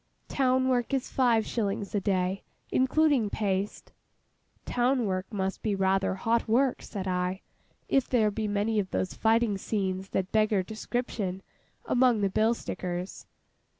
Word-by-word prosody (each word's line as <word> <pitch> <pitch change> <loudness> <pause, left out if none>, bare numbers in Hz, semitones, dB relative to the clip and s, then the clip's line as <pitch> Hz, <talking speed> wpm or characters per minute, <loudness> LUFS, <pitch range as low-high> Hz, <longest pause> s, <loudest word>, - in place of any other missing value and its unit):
Town 260 -1 +2
work 250 +1 +1
is 265 - -3
five 235 -4 +3
shillings 200 -3 -2
a 205 - +2
day, 190 -1 0 0.3
including 265 -3 +3
paste.' 200 -1 -2 0.7
'Town 245 0 +1
work 185 0 -2
must 195 -2 -2
be 210 -2 0
rather 195 0 +1
hot 225 +5 0
work,' 250 +4 +2
said 195 -3 -6
I, 180 +1 -1 0.5
'if 270 -2 +1
there 220 -4 +3
be 215 +1 -2
many 210 +2 0
of 190 -2 -2
those 185 - -2
fighting 225 -2 +2
scenes 190 -2 -2
that 190 -1 -2
beggar 215 -3 +2
description, 215 -3 -3 0.4
among 250 - +3
the 200 - +2
bill 220 +4 +2
stickers? 180 -3 -5
210 Hz, 145 wpm, -28 LUFS, 190-240 Hz, 0.7 s, five